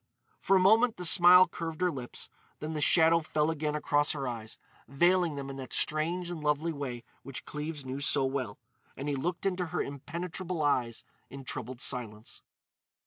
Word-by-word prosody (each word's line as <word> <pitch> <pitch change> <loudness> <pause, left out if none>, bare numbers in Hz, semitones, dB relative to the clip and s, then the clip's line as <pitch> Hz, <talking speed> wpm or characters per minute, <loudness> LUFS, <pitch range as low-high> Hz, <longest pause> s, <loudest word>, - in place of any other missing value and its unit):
For 195 - +2
a - - +5
moment 220 +5 +4
the 180 - -3
smile 180 +2 +8
curved 165 -2 -6
her 180 -1 +2
lips, 130 -5 -6 0.3
then 155 +1 -5
the 150 - -3
shadow 165 +1 +5
fell 155 -1 0
again 150 -1 -2
across 145 0 +1
her 140 -3 -4
eyes, 115 -3 -6 0.3
veiling 175 +4 +2
them 140 -1 -6
in 135 0 -7
that 130 -2 -7
strange 170 +3 0
and 160 -3 -6
lovely 150 +3 0
way 130 -5 -5 0.2
which 135 -2 -8
Cleves 150 -1 -6
knew 130 +1 -5
so 140 -1 +2
well; 130 -6 -3 0.4
and 140 - -5
he 145 - -1
looked 170 +8 -3
into 180 -2 -1
her 175 +2 -2
impenetrable 165 +4 -5
eyes 125 -5 0 0.3
in 135 +1 -9
troubled 125 0 -6
silence. 110 -3 -2
150 Hz, 180 wpm, -29 LUFS, 135-175 Hz, 0.4 s, smile